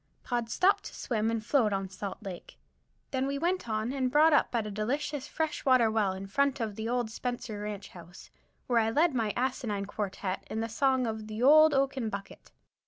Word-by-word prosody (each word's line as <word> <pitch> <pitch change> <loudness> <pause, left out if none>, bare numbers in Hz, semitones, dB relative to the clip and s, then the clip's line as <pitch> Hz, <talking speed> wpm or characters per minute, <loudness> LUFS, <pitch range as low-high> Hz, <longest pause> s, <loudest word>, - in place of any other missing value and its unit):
Pod 240 -2 -2
stopped 400 - +2
to - - -8
swim 225 -2 -1
and 225 -1 -2
float 235 -5 +3
on 195 -1 -1
Salt 190 +1 -6
Lake. 190 -4 -8 0.5
Then 265 0 0
we 280 0 -2
went 345 -3 -1
on 220 +3 -1
and 260 -2 0
brought 300 +4 +5
up 290 - +4
at 225 -2 0
a 210 - -5
delicious 275 +7 -2
fresh 315 -1 -2
water 255 -4 +4
well, 210 -4 +1
in 190 +1 -6
front 280 +7 +1
of 220 -3 -3
the 235 +3 -1
Spencer 230 -1 -5
Ranch 205 -2 -5
house, 175 +1 -13 0.3
where 240 -3 +2
I 220 0 +2
led 310 +7 +3
my 225 -4 0
asinine 240 -5 -1
quartette 195 -2 -4
in 220 - -3
the 225 0 -2
song 260 +2 +2
of 220 -1 -4
the 215 +2 -4
"Old 310 +2 +7
Oaken 270 -4 0
Bucket." 200 -1 -8
230 Hz, 200 wpm, -29 LUFS, 210-270 Hz, 0.5 s, Old